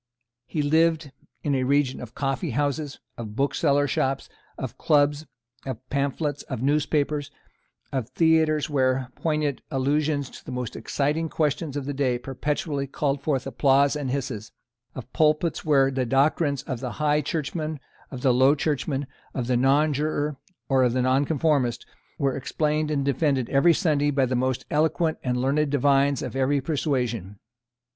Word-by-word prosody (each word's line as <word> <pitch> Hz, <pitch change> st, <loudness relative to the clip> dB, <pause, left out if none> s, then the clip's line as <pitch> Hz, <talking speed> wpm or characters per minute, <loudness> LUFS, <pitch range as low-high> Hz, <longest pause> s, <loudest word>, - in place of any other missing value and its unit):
He 150 Hz, -, -1 dB
lived 160 Hz, 0 st, +2 dB, 0.3 s
in 145 Hz, -, 0 dB
a 130 Hz, -1 st, +1 dB
region 140 Hz, 0 st, +1 dB
of 120 Hz, -1 st, -9 dB
coffeehouses, 140 Hz, +1 st, -2 dB, 0.2 s
of 105 Hz, -2 st, -6 dB
booksellers' 140 Hz, +1 st, +1 dB
shops, 135 Hz, +1 st, -1 dB, 0.3 s
of 130 Hz, -2 st, -5 dB
clubs, 145 Hz, +1 st, +2 dB, 0.4 s
of 130 Hz, -1 st, -6 dB
pamphlets, 140 Hz, +1 st, -1 dB
of -, -, -3 dB
newspapers, 145 Hz, 0 st, +1 dB, 0.6 s
of 130 Hz, -5 st, -2 dB
theatres 160 Hz, -2 st, +3 dB
where 130 Hz, -2 st, 0 dB
poignant 150 Hz, -3 st, -1 dB
allusions 145 Hz, 0 st, 0 dB
to -, -, -12 dB
the -, -, -8 dB
most 125 Hz, -2 st, -4 dB
exciting 150 Hz, +3 st, -1 dB
questions 150 Hz, -1 st, -1 dB
of 140 Hz, -, -4 dB
the 145 Hz, -, -3 dB
day 130 Hz, -3 st, +1 dB
perpetually 140 Hz, +2 st, -3 dB
called 140 Hz, 0 st, -1 dB
forth 140 Hz, -3 st, -1 dB
applause 135 Hz, +2 st, +3 dB
and 145 Hz, -3 st, -3 dB
hisses, 125 Hz, -5 st, -4 dB, 0.4 s
of 125 Hz, -1 st, -9 dB
pulpits 155 Hz, +1 st, +2 dB
where 135 Hz, -3 st, +3 dB
the 130 Hz, -1 st, 0 dB
doctrines 140 Hz, +2 st, +2 dB
of 130 Hz, -3 st, -4 dB
the 125 Hz, -3 st, -4 dB
High 150 Hz, +3 st, +1 dB
Churchman, 155 Hz, +1 st, -3 dB, 0.3 s
of 130 Hz, -, -7 dB
the 130 Hz, -, +4 dB
Low 130 Hz, +4 st, +5 dB
Churchman, 145 Hz, -1 st, -1 dB, 0.3 s
of 125 Hz, -, -1 dB
the 125 Hz, +1 st, +1 dB
Nonjuror, 145 Hz, +3 st, +1 dB, 0.3 s
of 130 Hz, -3 st, +3 dB
the 130 Hz, 0 st, +1 dB
Nonconformist, 135 Hz, -1 st, +1 dB, 0.3 s
were 140 Hz, -4 st, 0 dB
explained 150 Hz, +3 st, -1 dB
and 140 Hz, -3 st, 0 dB
defended 140 Hz, -3 st, +1 dB
every 165 Hz, +5 st, +5 dB
Sunday 145 Hz, -3 st, +2 dB
by 135 Hz, -2 st, +2 dB
the 130 Hz, 0 st, -1 dB
most 130 Hz, 0 st, -1 dB
eloquent 160 Hz, +1 st, +1 dB
and 125 Hz, -1 st, 0 dB
learned 140 Hz, +4 st, +1 dB
divines 140 Hz, -1 st, +2 dB
of -, -, -5 dB
every 135 Hz, +2 st, +2 dB
persuasion. 125 Hz, -, -2 dB
140 Hz, 150 wpm, -25 LUFS, 130-150 Hz, 0.6 s, Low